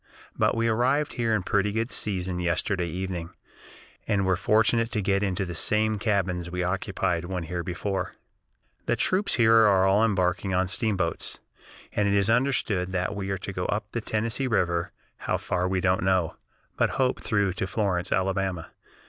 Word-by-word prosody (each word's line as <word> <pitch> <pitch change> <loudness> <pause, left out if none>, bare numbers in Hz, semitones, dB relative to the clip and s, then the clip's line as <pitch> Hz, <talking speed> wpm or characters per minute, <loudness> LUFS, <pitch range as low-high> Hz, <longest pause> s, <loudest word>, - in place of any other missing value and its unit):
But - - +1
we 115 0 +1
arrived 130 +6 +1
here 115 -3 +1
in 100 - -1
pretty 100 +2 +1
good 115 +3 -2
season 90 -3 -2
yesterday 90 +1 0
evening, 90 0 -4 0.8
and 100 -3 +1
were 95 0 +3
fortunate 110 +4 +2
to 105 - 0
get 100 0 +1
into 100 -1 -1
the 90 - -5
same 105 +4 +2
cabins 95 -5 0
we 90 0 -2
occupied 90 -1 -1
when 90 -1 -3
here 85 +2 -4
before. 95 +1 -3 0.7
"The - - +2
troops 190 +3 +1
here 115 -2 +4
are 105 -4 +5
all 100 +3 +4
embarking 95 -3 +1
on 95 +1 +2
steamboats, 95 -3 -1 0.5
and 105 - +1
it 100 - +2
is 100 +2 +3
understood 115 -7 +1
that 90 +1 -1
we 100 -1 -4
are 95 - -1
to - - -6
go - - -2
up - - -3
the - - -3
Tennessee 115 +5 -1
River, 85 -7 0 0.3
how - - -1
far 90 +1 -1
we 95 0 0
don't 90 0 +1
know, 95 -3 +1 0.4
but - - +3
hope 130 -1 +1
through 100 -4 +1
to 95 +1 -3
Florence, 95 -3 -1
Alabama. 95 -3 -1
95 Hz, 175 wpm, -26 LUFS, 90-110 Hz, 0.8 s, are